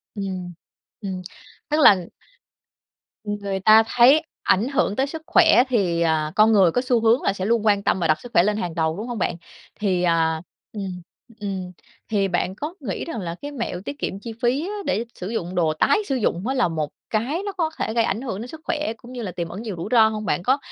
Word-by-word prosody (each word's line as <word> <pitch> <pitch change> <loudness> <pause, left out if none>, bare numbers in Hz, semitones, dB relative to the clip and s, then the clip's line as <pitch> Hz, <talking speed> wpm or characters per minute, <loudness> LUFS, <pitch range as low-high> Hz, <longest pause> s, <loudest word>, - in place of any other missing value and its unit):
Ừm, 185 -3 -5 0.5
ừm, 190 -2 -4 0.5
tức 300 - +1
là 190 - +6 1.2
ng 205 0 -2
người 195 -1 -2
ta 215 +3 +7
thấy 265 +8 +5 0.2
ảnh 215 +7 +2
hưởng 270 -7 0
tới 270 +2 +1
sức 320 +2 -7
khỏe 325 -8 +6
thì, 180 -8 +1
à, 155 -2 +1
con 215 +1 +5
người 190 -6 +5
có 245 - +1
xu 245 -2 +3
hướng 230 +2 +4
là 195 - +1
sẽ 190 -1 -4
luôn 225 0 +1
quan 200 -1 +3
tâm 190 - +1
và 170 - +1
đặt 155 0 +2
sức 245 - -11
khỏe 170 - +5
lên 210 +1 +1
hàng 175 -6 -3
đầu, 160 +1 0
đúng 220 +4 -5
hông 240 -2 -4
bạn? 175 - -1 0.4
Thì, 185 -4 +1
à 160 -2 +2 0.3
ừm, 190 -4 -5 0.4
ừm, 190 -3 -4 0.4
thì 200 -3 +1
bạn 180 +1 -1
có 300 +8 -5
nghĩ 225 -10 -4
rằng 325 -9 -5
là 170 -1 -4
cái 290 0 -6
mẹo 230 -9 -4
tiết 285 0 -6
kiệm 195 - -3
chi 230 +2 -7
phí 265 +8 +1
á 415 - -4
để 215 +6 0
sử 185 +3 -6
dụng 180 -5 -3
đồ 160 -3 +2
tái 155 - +3
sử 270 - 0
dụng 205 -3 -1
á 265 - 0
là 245 -7 +3
một 155 -3 -2 0.2
cái 265 - -1
nó 400 - -2
có 325 -2 +1
thể 220 - -2
gây 230 -1 +3
ảnh 215 +4 -1
hưởng 225 -6 -4
đến 240 - -6
sức 315 +3 -10
khỏe, 300 -8 -2
cũng 240 +3 -14
như 245 -2 -6
là 195 -5 -4
tiềm 170 -1 -4
ẩn 195 +6 -7
nhiều 215 -5 -5
rủi 170 - -5
ro 225 -3 +6
hông? 215 -1 -4
Bạn 160 +4 -1
có 260 +5 +3
210 Hz, 240 wpm, -23 LUFS, 180-245 Hz, 1.2 s, ta